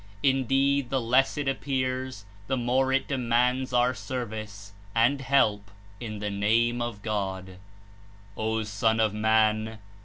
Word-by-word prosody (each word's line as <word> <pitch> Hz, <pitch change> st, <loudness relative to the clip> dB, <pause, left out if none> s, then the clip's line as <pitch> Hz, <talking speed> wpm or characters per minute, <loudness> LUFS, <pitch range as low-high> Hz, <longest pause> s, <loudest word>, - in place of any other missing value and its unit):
Indeed, 135 Hz, 0 st, +2 dB
the 135 Hz, -, +1 dB
less 130 Hz, +4 st, +2 dB
It 145 Hz, -1 st, -2 dB
appears, 130 Hz, -4 st, -2 dB, 0.2 s
the 135 Hz, -, 0 dB
more 130 Hz, +2 st, +1 dB
it 135 Hz, 0 st, +1 dB
demands 125 Hz, -1 st, +1 dB
our 125 Hz, +1 st, +3 dB
service 110 Hz, -6 st, -6 dB, 0.2 s
and 120 Hz, +5 st, +3 dB
help 110 Hz, -7 st, +2 dB, 0.3 s
in 110 Hz, -3 st, -6 dB
the 105 Hz, 0 st, -3 dB
Name 115 Hz, +4 st, +1 dB
of 115 Hz, -4 st, -4 dB
God. 95 Hz, -3 st, -3 dB, 0.8 s
''O 110 Hz, 0 st, -1 dB
Son 110 Hz, +2 st, +1 dB
of 110 Hz, -2 st, +2 dB
Man! 110 Hz, 0 st, +2 dB
120 Hz, 130 wpm, -27 LUFS, 110-130 Hz, 0.8 s, our